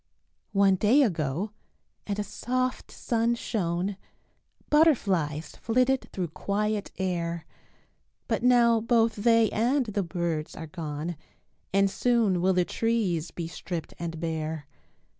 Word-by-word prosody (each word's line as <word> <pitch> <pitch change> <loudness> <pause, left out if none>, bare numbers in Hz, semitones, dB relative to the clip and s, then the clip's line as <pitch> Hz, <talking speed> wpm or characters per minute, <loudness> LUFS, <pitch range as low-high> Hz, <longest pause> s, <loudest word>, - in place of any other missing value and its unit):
One 195 -1 +4
day 240 +9 +5
ago 170 - -1 0.6
and 205 -1 -2
a 210 - -1
soft 255 +4 -2
sun 235 0 0
shone, 185 -3 -2 0.7
Butterflies 190 - +2
flitted 255 +3 +1
through 180 -3 -3
quiet 210 +5 -1
air, 170 -3 -2 0.8
But 225 -2 0
now 240 -2 +5
both 225 -1 +2
they 230 +1 +4
and 250 +5 +2
the 210 -2 -1
birds 170 -3 -3
are 160 - -6
gone 155 0 -5 0.5
And 195 +1 +4
soon 215 -4 +2
will 190 +1 +3
the 180 -1 +2
trees 195 -9 0
be 170 -2 -5
stripped 170 -1 -6
and 165 -1 -4
bare. 160 -2 -3
195 Hz, 120 wpm, -27 LUFS, 170-230 Hz, 0.8 s, day